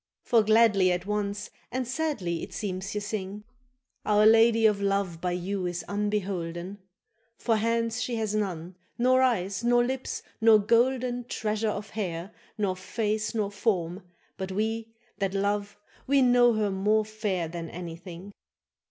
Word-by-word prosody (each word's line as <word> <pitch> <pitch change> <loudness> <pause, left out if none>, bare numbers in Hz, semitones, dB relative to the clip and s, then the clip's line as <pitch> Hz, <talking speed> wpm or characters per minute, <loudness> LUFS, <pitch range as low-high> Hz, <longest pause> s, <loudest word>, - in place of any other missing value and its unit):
For 230 -2 +4
gladly 210 -3 +4
at 180 +1 -2
once 205 0 -2 0.2
and 255 0 -2
sadly 255 - -2
it - - -7
seems 195 -1 -4
ye 210 - -1
sing. 205 -1 -5 0.6
—Our 210 0 +4
lady 225 0 +6
of 210 -2 +3
love 195 -4 0
by 180 -1 -1
you 185 +1 -2
is 175 -1 -4
unbeholden; 195 -3 -3 0.6
For 225 -2 +1
hands 230 +1 0
she 245 - -2
hath 220 -2 -1
none, 185 -5 -2 0.2
nor 255 +2 +4
eyes, 200 -5 +1
nor 240 0 +4
lips, 260 +1 -3 0.2
nor 225 -1 +7
golden 245 +3 +1
Treasure 215 -2 -1
of 205 0 -5
hair, 185 -3 -4 0.3
nor 200 -3 0
face 215 +3 -2
nor 205 -2 0
form; 190 -4 -1 0.4
but 190 0 -4
we 220 +3 -2 0.3
That 195 0 -1
love, 200 +1 -1 0.3
we 275 0 +4
know 245 -1 +5
her 215 -2 0
more 210 +3 +2
fair 210 -5 -2
than 165 0 -6
anything. 175 +2 -8
210 Hz, 150 wpm, -27 LUFS, 190-225 Hz, 0.6 s, nor